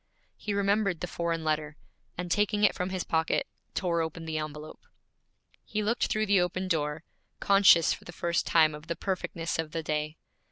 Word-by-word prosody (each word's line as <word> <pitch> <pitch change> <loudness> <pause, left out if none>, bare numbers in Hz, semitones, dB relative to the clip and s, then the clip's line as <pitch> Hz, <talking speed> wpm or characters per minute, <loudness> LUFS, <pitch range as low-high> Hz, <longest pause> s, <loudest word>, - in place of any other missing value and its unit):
He 205 -2 -3
remembered 200 -3 +1
the 180 - -2
foreign 170 -1 -2
letter, 155 -1 -1 0.4
and 180 0 -4
taking 210 +1 +2
it 210 - +5
from 180 +1 -3
his 185 -1 -2
pocket, 160 0 +1 0.3
tore 170 -3 +1
open 160 0 -4
the 160 -1 -2
envelope. 155 0 -7 0.8
He 215 0 -2
looked 230 +4 +1
through 215 0 0
the 200 -3 +4
open 185 +1 -1
door, 155 -2 -1 0.4
conscious 195 -4 +6
for - - -10
the - - -8
first 170 0 -1
time 155 -2 +5
of 150 +1 -10
the 170 - -2
perfectness 170 -4 -3
of 155 -1 -3
the 165 - -2
day. 150 0 -2
170 Hz, 185 wpm, -29 LUFS, 160-195 Hz, 0.8 s, conscious